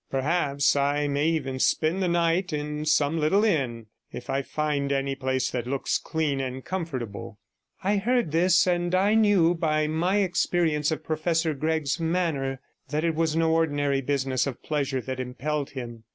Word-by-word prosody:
Perhaps 140 0 +1
I 145 +1 +1
may 145 +2 0
even 135 -5 -1
spend 160 +7 +1
the 185 - +1
night 170 +2 +1
in 150 0 -3
some 150 +1 +2
little 160 +7 +3
inn, 130 - 0 0.3
if - - -6
I 135 - 0
find 145 -1 -2
any 135 0 0
place 130 -1 -1
that 120 -1 -3
looks 135 +1 -1
clean 155 -4 -1
and 130 0 -5
comfortable.' 135 - -5 0.5
I 200 +2 +2
heard 235 -3 +1
this, 180 +2 +4
and 175 -1 +1 0.3
knew 190 -6 +4
by 155 -2 0
my 175 +6 +1
experience 175 -5 +1
of 160 - -3
Professor 160 +1 0
Gregg's 155 +1 -1
manner 160 -6 -1 0.3
that 150 +1 -1
it 165 -1 +1
was 160 0 0
no 165 0 +2
ordinary 145 -4 +1
business 135 -1 0
of 130 -3 -6
pleasure 140 -3 -1
that 130 +1 -5
impelled 135 +3 -3
him. 120 -4 -8
150 Hz, 165 wpm, -26 LUFS, 135-165 Hz, 0.5 s, this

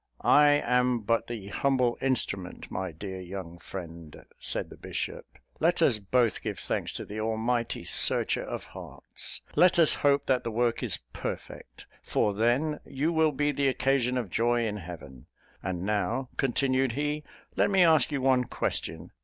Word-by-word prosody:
"I 150 0 +6
am 125 -3 +2
but 115 +2 0
the 110 -5 -6
humble 130 -1 +1
instrument, 100 -8 -2
my 95 -1 -3
dear 95 +4 -7
young 90 -2 -7
friend," 85 -4 -9
said - - -1
the - - -9
bishop; - - -5 0.3
"let 170 +2 +2
us 120 -8 +3
both 115 +3 +1
give - - -4
thanks - - -2
to - - -4
the 105 +1 -6
almighty 115 +2 -1
Searcher - - +3
of - - -5
hearts. - - -8
Let 180 +3 +5
us 165 -3 +5
hope 140 0 +3
that 130 -2 +1
the - - -2
work 120 +1 0
is - - -1 0.2
perfect - - -7 0.2
for 105 - 0
then, 120 +9 +1
you 150 +5 -1
will 160 -1 +3
be 145 +1 0
the 140 -1 0
occasion 130 -1 +1
of 115 -8 -3
'joy 120 +3 +2
in 105 -1 -2
heaven.' 80 -9 -10 0.3
And 90 -1 -3
now," 110 +5 -1
continued 130 -1 +1
he, 150 +2 -2 0.3
"let - - +3
me 190 -2 +5
ask 160 -4 +5
you 140 -2 -1
one 130 -1 +3
question. 80 -5 -3
120 Hz, 165 wpm, -28 LUFS, 100-140 Hz, 0.3 s, I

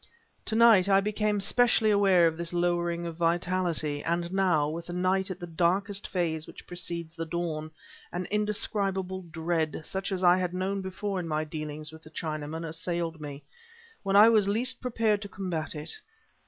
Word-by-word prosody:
To 220 - -1
night 220 -5 +6
I 195 0 +6
became 210 +1 0
specially 225 +1 +3
aware 195 -4 +5
of 165 -1 +2
this 170 +1 -5
lowering 175 -1 0
of 165 -1 -6
vitality, 170 -3 0
and 170 +1 -1
now, 180 -6 +3
with 165 +2 -5
the 175 - -5
night 185 +2 +1
at 185 -1 -5
that 175 -2 -9
darkest 195 +4 +1
phase 160 -4 -1
which - - -12
precedes 170 -2 -4
the 165 0 -4
dawn, 160 -2 -3 0.4
an 180 +1 -3
indescribable 200 -3 0
dread, 160 -1 -1
such 190 +1 -3
as 190 -1 -2
I 175 0 +6
had 180 -1 -2
known 195 +2 -1
before 190 +1 -3
in 175 - -4
my 155 -1 0
dealings 155 -1 -6
with 160 0 -12
the 155 - -14
Chinaman, 155 0 -4
assailed 165 0 -3
me, 145 -1 -7 0.6
when 195 -1 0
I 210 +2 +9
was 215 -3 +4
least 245 +5 0
prepared 225 -4 +1
to 200 - -7
combat 175 -5 -4
it. 150 0 -5
175 Hz, 180 wpm, -28 LUFS, 165-195 Hz, 0.6 s, I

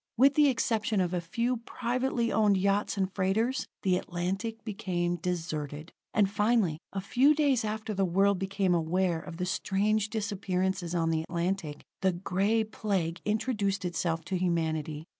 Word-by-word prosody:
With 270 +4 +6
the 295 0 +5
exception 225 -4 0
of 180 -1 0
a 175 - 0
few 235 +9 -1
privately 240 +1 -1
owned 210 -3 +3
yachts 200 +2 +1
and 190 -1 -1
freighters, 220 +7 0 0.2
the 185 -2 +3
Atlantic 190 +7 -3
became 180 -5 -1
deserted. 160 -3 -4 0.2
And 205 -2 +3
finally, 205 -5 +1
a 195 - -3
few 255 +9 +4
days 285 -6 +2
after 215 0 -3
the 195 -1 +1
world 195 +2 +3
became 190 -1 0
aware 170 +1 +1
of 165 0 -9
the 180 - -1
strange 205 +3 0
disappearances 190 -4 -1
on 165 -1 +1
the 160 -1 +1
Atlantic, 170 -2 -3 0.2
the 190 -1 +2
Gray 195 +5 +1
Plague 195 -6 -2
introduced 210 -3 0
itself 165 -2 -1
to 190 - -1
humanity. 160 -4 -1
195 Hz, 155 wpm, -29 LUFS, 175-220 Hz, 0.2 s, With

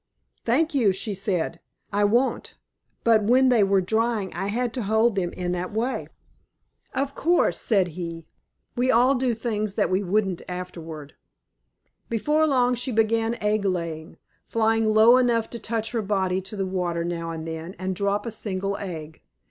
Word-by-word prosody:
"Thank 310 +8 +2
you," 230 -9 +3
she 205 +2 -3
said. 180 -4 -2 0.3
"I 205 0 +3
won't. 240 +6 +1 0.5
But 225 -2 +5
when 255 +4 +4
they 235 -4 +4
were 195 -1 +3
drying 220 0 0
I 195 +3 -3
had 235 +3 -1
to 250 - -3
hold 220 +1 +2
them 180 -3 0
in 180 -1 -3
that 180 0 -3
way." 235 +5 -2 0.9
"Of 275 +1 -1
course," 345 +4 +2
said 195 -5 +2
he. 165 -1 -6 0.5
"We 250 +1 +1
all 250 +3 +5
do 250 -3 0
things 215 -3 -2
then 210 - +2
that - - -3
we 185 +2 +2
wouldn't 195 -1 0
afterward." 165 -5 -7 1.0
Before 300 +7 +2
long 250 -3 +3
she 245 +2 -2
began 225 +1 +1
egg 210 0 +1
laying, 170 -4 -3 0.3
flying 225 0 +2
low 220 +3 +6
enough 235 -3 +1
to 235 - -6
touch 225 -1 -2
her 230 - -1
body 190 -2 0
to 195 +3 -8
the 195 -1 -1
water 180 -3 -2
now 170 -1 -3
and 165 -1 -5
then 160 +3 -6
and 185 0 -3
drop 200 +2 0
a 230 - -3
single 200 -2 -3
egg. 160 -5 -7
210 Hz, 170 wpm, -25 LUFS, 185-235 Hz, 1.0 s, low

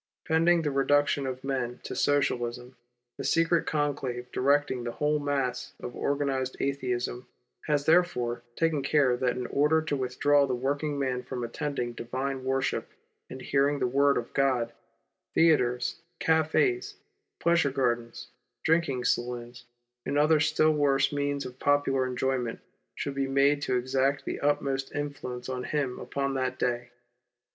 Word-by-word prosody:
Pending 165 +1 +3
the 150 - 0
reduction 140 0 +2
of 130 0 -5
men 130 -3 -2
to - - -6
Socialism, 125 -3 0 0.4
the - - -3
secret 165 0 +2
conclave 135 -5 -2
directing 140 -1 +1
the 120 -1 -4
whole 150 0 +1
mass 135 -4 -2
of 120 - -7
organized 140 -2 -1
Atheism 125 -2 -2 0.4
has 145 -1 +1
therefore 135 -9 +2
taken 165 -3 +1
care 135 -2 +3
that 125 0 0
in 125 - -3
order 150 +5 +3
to 150 -2 -1
withdraw 140 +2 +2
the 130 - 0
working 145 +3 -1
man 130 -2 -1
from 125 -1 -5
attending 120 0 -3
divine 130 +3 -4
worship 135 0 -1 0.4
and 130 - -8
the - - -9
hearing 140 +1 +2
of 140 - -6
the - - +3
Word 140 +2 +3
of 120 - -4
God, 125 -4 +1 0.6
theatres, 125 -4 +2 0.2
cafes, 160 - +1 0.4
pleasure 170 -4 +3
gardens, 120 -2 -2 0.3
drinking 160 -6 +1
saloons, 120 0 -2 0.4
and 145 - -1
other 155 +1 +4
still 155 +1 +3
worse 145 -2 +2
means 145 0 -1
of 125 0 -9
popular 140 -2 +2
enjoyment 125 -2 -1 0.4
shall 140 - -4
])e 135 - +1
made 140 +2 +3
to 130 - 0
exert 135 +2 0
the - - -3
utmost 140 -1 -1
influence 140 -4 -4
on 130 -1 -3
him 135 -4 -2
upon 140 0 -2
that 130 -1 -1
day. 120 -1 -1
135 Hz, 150 wpm, -28 LUFS, 125-145 Hz, 0.6 s, other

